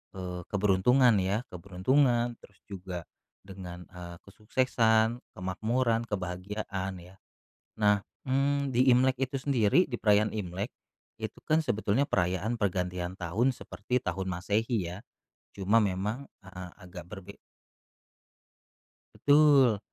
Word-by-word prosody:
eee, 90 -1 -5
keberuntungan 105 +5 +4
ya, 100 +5 0
keberuntungan 120 +7 +1
terus 100 -5 -19
juga 90 -3 -7 0.4
dengan, 90 -2 -9
eee, 90 -1 -9
kesuksesan, 110 +1 +1 0.2
kemakmuran, 115 +6 0
kebahagiaan 95 0 -4
ya. 90 +2 -15 0.6
Nah, 105 -1 +3 0.2
mmm, 140 +1 +1
di 130 +2 +5
Imlek 130 +1 +3
itu 135 +1 -3
sendiri, 130 - +3
di 120 - -2
perayaan 105 0 +3
Imlek, 95 +1 -3 0.5
itu - - -6
kan 160 +1 +3
sebetulnya 110 -1 +1
perayaan 95 +4 -1
pergantian 90 -2 -2
tahun 100 +9 +1
seperti 125 +4 -3
tahun 95 +1 -3
Masehi 100 +2 -1
ya. - - -7 0.5
Cuma 105 +3 +2
memang 105 +7 -2 0.2
heeh, 90 -1 -9
agak 90 -2 -10
berge 100 -1 -10 1.8
Betul. 145 -6 +5
105 Hz, 110 wpm, -29 LUFS, 95-120 Hz, 1.8 s, di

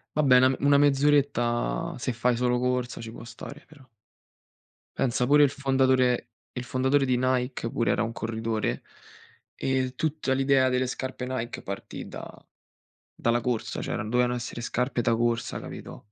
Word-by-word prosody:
Vabbè, 135 -4 +5
na 130 +1 +4
una 140 0 +4
mezz'oretta 145 +1 +2
se 125 0 -2
fai 120 +1 +1
solo 125 0 +1
corsa 125 -1 -1
ci 115 - -7
può 115 - -10
stare 140 +6 -10
però. 150 -4 -17 1.1
Pensa 125 -1 +1
pure 145 +2 +6
il 140 - +3
fondatore 130 -3 +2 0.2
il 125 - -5
fondatore 130 +4 +1
di 125 - +2
Nike 125 -1 -1
pure 115 - +1
era - - +1
un 115 - -2
corridore. 110 - -2 0.7
Ehm, 130 -1 -1
tutta 155 -1 -1
l'idea 135 -1 +3
delle 125 0 +1
scarpe 130 0 -4
Nike 120 -2 -4
partì 100 0 -7
da - - -8 0.9
dalla 120 +1 +1
corsa, 120 -3 -2
cioè - - -3
dovevano 125 +4 +1
essere 120 0 -5
scarpe 125 +1 -1
da 115 - +2
corsa, 120 0 -1
capito? - - -9
125 Hz, 155 wpm, -27 LUFS, 120-135 Hz, 1.1 s, pure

